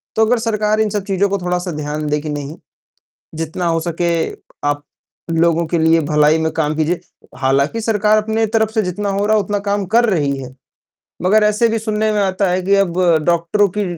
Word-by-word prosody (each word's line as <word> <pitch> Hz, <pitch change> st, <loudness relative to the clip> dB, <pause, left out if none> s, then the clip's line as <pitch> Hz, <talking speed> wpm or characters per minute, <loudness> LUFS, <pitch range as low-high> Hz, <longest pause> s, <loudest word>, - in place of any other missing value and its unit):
तो 220 Hz, 0 st, +4 dB
अगर 245 Hz, +2 st, +2 dB
सरकार 215 Hz, -1 st, 0 dB
इन 215 Hz, -, +1 dB
सब 205 Hz, -1 st, -2 dB
चीज़ों 200 Hz, 0 st, +1 dB
को 200 Hz, -, 0 dB
थोड़ा-सा 180 Hz, 0 st, -2 dB
ध्यान 150 Hz, 0 st, -4 dB
दे 150 Hz, 0 st, +1 dB
कि 155 Hz, -, -6 dB
नहीं, 145 Hz, +1 st, -5 dB, 0.8 s
जितना 165 Hz, +2 st, -4 dB
हो 165 Hz, 0 st, +1 dB
सके 170 Hz, +1 st, -1 dB, 0.5 s
आप 145 Hz, 0 st, -1 dB, 0.5 s
लोगों 165 Hz, 0 st, +2 dB
के 170 Hz, -, 0 dB
लिए 160 Hz, +1 st, +4 dB
भलाई 150 Hz, +1 st, +3 dB
में 160 Hz, 0 st, 0 dB
काम 155 Hz, -1 st, 0 dB
कीजिए 160 Hz, +2 st, 0 dB, 0.4 s
हालाँकि 140 Hz, +10 st, +1 dB
सरकार 215 Hz, -1 st, +2 dB
अपने 220 Hz, +1 st, 0 dB
तरफ 220 Hz, 0 st, +1 dB
से 220 Hz, -1 st, +1 dB
जितना 200 Hz, +2 st, -3 dB
हो 200 Hz, +1 st, 0 dB
रहा 215 Hz, 0 st, +3 dB
है, 205 Hz, -, +1 dB
उतना 205 Hz, +1 st, -2 dB
काम 200 Hz, -1 st, -1 dB
कर 240 Hz, 0 st, +5 dB
रही 145 Hz, -7 st, 0 dB
है, 130 Hz, -1 st, -8 dB, 0.7 s
मगर 210 Hz, +4 st, +4 dB
ऐसे 210 Hz, +2 st, +2 dB
भी 225 Hz, 0 st, 0 dB
सुनने 215 Hz, 0 st, -1 dB
में 210 Hz, -, +1 dB
आता 190 Hz, 0 st, +1 dB
है 185 Hz, +1 st, 0 dB
कि 200 Hz, +2 st, +2 dB
अब 190 Hz, -4 st, +1 dB, 0.3 s
डॉक्टरों 175 Hz, +4 st, +2 dB
की 205 Hz, -, 0 dB
185 Hz, 205 wpm, -17 LUFS, 160-210 Hz, 0.8 s, कर